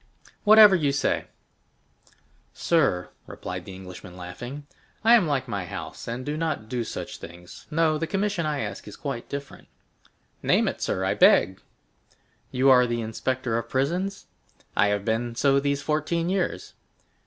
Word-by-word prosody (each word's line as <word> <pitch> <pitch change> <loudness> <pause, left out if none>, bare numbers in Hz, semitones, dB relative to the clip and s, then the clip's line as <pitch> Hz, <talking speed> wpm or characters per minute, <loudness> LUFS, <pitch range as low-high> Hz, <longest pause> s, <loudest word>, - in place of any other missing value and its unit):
Whatever 210 -2 +9
you 150 -5 +1
say." 140 0 0 1.3
"Sir," 135 - +1 0.2
replied - - -6
the 95 - -9
Englishman, 90 -1 -10
laughing, 120 +11 -8 0.4
"I 230 +2 +6
am 220 -8 +5
like 135 -3 -1
my 100 -6 -3
house, - - -7
and 120 +2 -4
do 150 - -2
not 155 -8 -2
do 120 +1 -2
such 110 - -6
things—no, 150 - -2
the 165 - -2
commission 195 -2 -1
I 150 -2 -1
ask - - -6
is - - -9
quite 135 -5 -5
different." 140 0 -7 0.7
"Name - - +3
it, - - -3
sir, - - -1
I - - +1
beg." 95 +2 +4 0.9
"You 130 +1 +4
are 125 -1 +6
the 120 0 -1
inspector 115 +1 -2
of 115 0 -8
prisons?" 175 +10 -1 0.5
"I 105 - +4
have 100 -1 -1
been 115 +1 -1
so 140 +2 +3
these 140 0 -1
fourteen 160 +3 0
years." 190 -2 -2
135 Hz, 155 wpm, -25 LUFS, 115-160 Hz, 1.3 s, Whatever